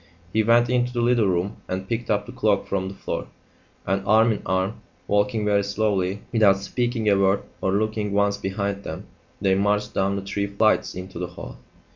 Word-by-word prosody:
He 110 - +3
went 115 +2 +4
into 125 0 +1
the 120 -1 -1
little 120 -3 +3
room 95 +3 -1
and 95 +1 -4
picked 115 +2 -3
up 105 -1 +1
the 120 - -9
cloak 110 -6 +1
from 95 -1 -2
the 100 - -9
floor, - - -4 0.6
and, 95 +2 0
arm 110 +1 +5
in 105 - -2
arm, 95 +3 -1 0.3
walking 105 +2 +1
very 100 -1 +2
slowly, 100 -2 -1
without 105 -4 +5
speaking 120 +2 -2
a 100 - +5
word 100 0 +2 0.2
or 95 - +1
looking 105 0 0
once 100 0 +2
behind 100 0 -3
them, 80 +6 -6 0.3
they 95 -1 +2
marched 105 +2 +1
down 100 +1 +1
the 100 - -4
three 100 +1 -2
flights 105 +2 +1
into 90 -1 -7
the 90 - -2
hall. 90 - -10
100 Hz, 195 wpm, -24 LUFS, 95-110 Hz, 0.6 s, arm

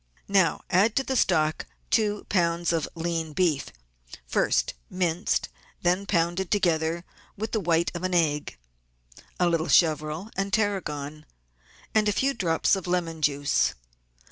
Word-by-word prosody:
Now 185 -5 +3
add 205 +5 +3
to 270 - +2
the 265 - -2
stock 155 -9 +1 0.2
two 210 -2 +1
lbs. 170 -2 +1
of 160 -3 -1
lean 165 -1 -3
beef 165 -5 +1 0.6
(first - - +1 0.2
minced 180 0 0
and - - -18 0.3
then 180 +3 +2
pounded 175 0 0
together 170 -3 +1 0.3
with 220 +3 -4
the 220 - 0
white 170 -2 +1
of 175 - -5
an 185 -1 -1
egg), 150 -4 0 0.8
a 180 - +3
little 165 -1 0
chervil 155 +4 +2
and 195 0 -2
tarragon, 155 -8 -2 0.7
and 215 -1 +3
a - - +1
few 275 +5 +1
drops 170 -4 +2
of 190 -2 -6
lemon 170 -3 -1
juice. 145 -1 +1
170 Hz, 140 wpm, -26 LUFS, 160-195 Hz, 0.8 s, Now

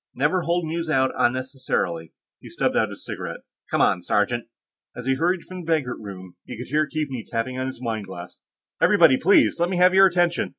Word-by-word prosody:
Never 150 +8 +1
hold 170 0 0
news 165 +1 -3
out 130 -3 +2
unnecessarily." 130 - -1 0.3
He - - -12
stubbed - - -1
out - - +2
his - - -10
cigarette. - - -6 0.3
"Come - - +1
on, 90 - +3
sergeant." 105 +6 0 0.5
As 125 - -7
he 135 - +2
hurried 170 +5 0
from 185 0 -9
the 165 - -12
banquet 150 -7 0
room, 95 -4 -10
he - - -9
could 125 - -8
hear 150 +2 +1
Keaveney 140 -6 -4
tapping 125 +3 -3
on 130 - -2
his 130 - -7
wine 110 -3 -3
glass. 90 -2 -10 0.4
"Everybody, 165 -10 +5
please! 185 +1 +4
Let 175 +1 +1
me 185 - -1
have 180 +1 +5
your 195 0 +7
attention! 175 -1 +1
135 Hz, 205 wpm, -23 LUFS, 120-170 Hz, 0.5 s, your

